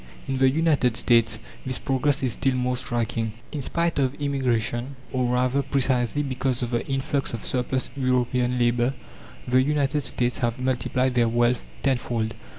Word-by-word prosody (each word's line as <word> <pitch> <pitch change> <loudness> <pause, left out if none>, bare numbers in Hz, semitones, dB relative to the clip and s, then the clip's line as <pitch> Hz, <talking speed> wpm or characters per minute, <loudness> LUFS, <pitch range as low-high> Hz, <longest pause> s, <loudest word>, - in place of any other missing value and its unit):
In 135 -1 -1
the 135 0 +5
United 140 -5 +2
States 115 -3 +3 0.3
this 130 -1 -1
progress 135 0 0
is 125 -4 +1
still 135 +3 0
more 125 0 0
striking. 115 -3 -2 0.2
In 150 - -3
spite 170 +3 0
of 135 0 +1
immigration, 130 -3 -1 0.2
or 125 -1 +1
rather 125 +2 +2
precisely 135 -1 +1
because 130 -2 -1
of 120 - -3
the 120 - 0
influx 135 -1 -1
of 115 - -8
surplus 130 0 -1
European 125 -1 +1
labour, 120 +2 +2 0.5
the 130 +1 +4
United 145 +1 +1
States 125 -1 -1
have 120 -1 0
multiplied 130 0 0
their 120 -2 +3
wealth 120 +1 +2 0.2
tenfold. 120 -4 0
125 Hz, 155 wpm, -25 LUFS, 120-135 Hz, 0.5 s, the